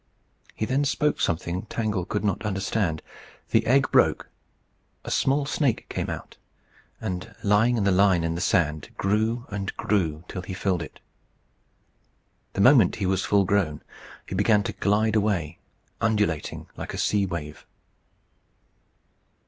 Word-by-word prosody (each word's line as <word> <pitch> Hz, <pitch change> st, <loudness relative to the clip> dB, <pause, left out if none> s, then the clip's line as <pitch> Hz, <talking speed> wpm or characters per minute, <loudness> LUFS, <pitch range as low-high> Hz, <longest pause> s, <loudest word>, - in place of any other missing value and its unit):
He 110 Hz, -, -1 dB
then 130 Hz, +5 st, +1 dB
spoke 150 Hz, +1 st, 0 dB
something 85 Hz, +4 st, -1 dB
Tangle 105 Hz, -6 st, -2 dB
could 105 Hz, +2 st, -2 dB
not 100 Hz, 0 st, -1 dB
understand. 95 Hz, -5 st, -1 dB, 0.5 s
The -, -, +3 dB
egg 135 Hz, +3 st, +3 dB
broke, -, -, +3 dB, 0.7 s
a -, -, -6 dB
small 140 Hz, +1 st, +2 dB
snake 145 Hz, -4 st, 0 dB
came -, -, -3 dB
out, -, -, -7 dB, 0.6 s
and, 90 Hz, 0 st, -5 dB
lying 110 Hz, +4 st, +3 dB
in 105 Hz, -, +1 dB
the 100 Hz, -, +3 dB
line 95 Hz, -2 st, +4 dB
in 85 Hz, 0 st, -1 dB
the 85 Hz, -, -4 dB
sand, 80 Hz, -6 st, +1 dB
grew 110 Hz, +4 st, 0 dB
and 100 Hz, -1 st, -4 dB
grew 85 Hz, -6 st, 0 dB
till 90 Hz, -, -5 dB
he 95 Hz, +1 st, -6 dB
filled 95 Hz, -2 st, 0 dB
it. 80 Hz, -, -9 dB, 1.5 s
The 100 Hz, -, 0 dB
moment 120 Hz, -4 st, +6 dB
he 100 Hz, -, -2 dB
was 95 Hz, 0 st, +1 dB
thus -, -, -4 dB
full 100 Hz, -1 st, +4 dB
grown, 90 Hz, -6 st, 0 dB, 0.4 s
he -, -, -7 dB
began 105 Hz, +2 st, +3 dB
to -, -, -3 dB
glide 105 Hz, +2 st, +1 dB
away, 95 Hz, -7 st, 0 dB, 0.4 s
undulating 105 Hz, -9 st, 0 dB
like -, -, -6 dB
a -, -, -5 dB
sea 100 Hz, -2 st, +1 dB
wave. 75 Hz, -4 st, -6 dB
100 Hz, 150 wpm, -25 LUFS, 90-110 Hz, 1.5 s, moment